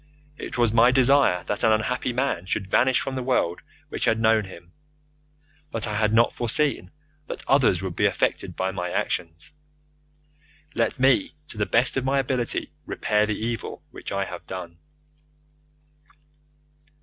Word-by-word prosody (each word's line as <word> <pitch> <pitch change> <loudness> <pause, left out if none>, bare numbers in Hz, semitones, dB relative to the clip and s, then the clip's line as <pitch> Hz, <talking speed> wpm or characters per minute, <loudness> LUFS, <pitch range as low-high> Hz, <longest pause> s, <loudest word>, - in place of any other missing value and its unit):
It - - -6
was 120 -2 +2
my 115 +1 +6
desire 130 -8 +4
that 105 - -3
an 110 - +5
unhappy 125 +4 0
man 120 -8 -1
should 95 - -1
vanish 130 +7 +3
from 135 - -4
the 130 - -3
world 125 -9 0 0.3
which - - -2
had 115 - +2
known 110 -2 +3
him, 85 -2 -13 1.0
but 115 -5 -2
I 105 - -3
had 105 0 +2
not 115 +1 +4
foreseen 140 +5 0 0.4
that - - -7
others 125 -10 +3
would 95 -3 -4
be - - +3
affected - - -1
by 95 0 -1
my 90 -2 -4
actions. 80 -2 -3 1.2
Let 115 -1 0
me 130 0 +3
to - - -10
the 105 - +1
best 125 +3 +2
of 135 - 0
my 135 +1 +1
ability 130 -3 -1 0.2
repair 105 0 +1
the 105 - -2
evil 115 +1 -4
which - - -8
I 100 0 -1
have 90 -2 -9
done. 85 -3 -7
110 Hz, 160 wpm, -24 LUFS, 95-125 Hz, 1.2 s, my